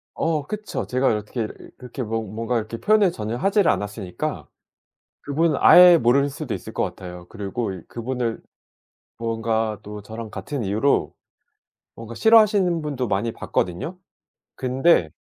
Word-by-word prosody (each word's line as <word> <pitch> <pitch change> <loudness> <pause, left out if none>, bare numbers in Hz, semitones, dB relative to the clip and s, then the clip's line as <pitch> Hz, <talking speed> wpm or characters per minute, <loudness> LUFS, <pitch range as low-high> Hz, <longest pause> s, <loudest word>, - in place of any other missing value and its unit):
어 160 -3 0
그쵸. 210 +3 -4
제가 130 +1 +1
이렇게 105 +2 -3
이 - - -4 0.3
이렇게 125 0 -6
뭐 115 +1 -2
뭔가 115 +3 -3
이렇게 110 +1 -4
표현을 210 - +3
전혀 110 +2 -4
하지를 195 - +3
않았으니까 100 -3 -4 0.8
그분은 150 +2 +1
아예 180 -1 +9
모를 140 +1 +3
수도 140 -3 -5
있을 - - -7
것 - - 0
같아요. 90 -1 -7
그리고 105 0 -4
이 90 - -9
그분을 120 -1 -3 0.8
뭔가 115 -2 -1
또 105 0 -8
저랑 110 +1 -8
같은 115 +7 -5
이유로 110 +8 +1 0.8
뭔가 115 0 -9
싫어하시는 205 - +4
분도 135 -5 -3
많이 105 +4 -1
봤거든요. 95 - -3 0.6
근데 130 - +2
115 Hz, 315 characters per minute, -23 LUFS, 110-150 Hz, 0.8 s, 아예